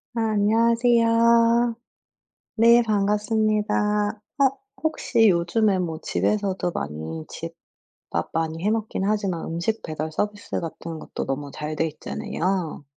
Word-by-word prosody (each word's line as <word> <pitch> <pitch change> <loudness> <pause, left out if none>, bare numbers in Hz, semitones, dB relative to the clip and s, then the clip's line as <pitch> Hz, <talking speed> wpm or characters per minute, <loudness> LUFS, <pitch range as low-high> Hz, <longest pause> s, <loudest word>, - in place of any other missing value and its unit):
아 230 - 0
안녕하세요. 230 +2 +3 0.8
네. 235 +2 +6
반갑습니다. 210 0 +1 0.2
어 275 - +6 0.3
혹시 245 -8 +2
요즘에 190 +4 +2
뭐 165 -3 -3
집에서도 195 -4 0
많이 80 - -5
집밥 - - -8
많이 165 0 -2
해 210 - +3
먹긴 220 -3 -2
하지만 200 -5 -1
음식 170 +7 -2
배달 155 0 -4
서비스 205 +5 -3
같은 165 0 -6
것도 - - -5
너무 140 +1 -3
잘 150 +1 -4
돼 160 - +1
있잖아요. 165 +1 -3
205 Hz, 250 characters per minute, -24 LUFS, 165-225 Hz, 0.8 s, 네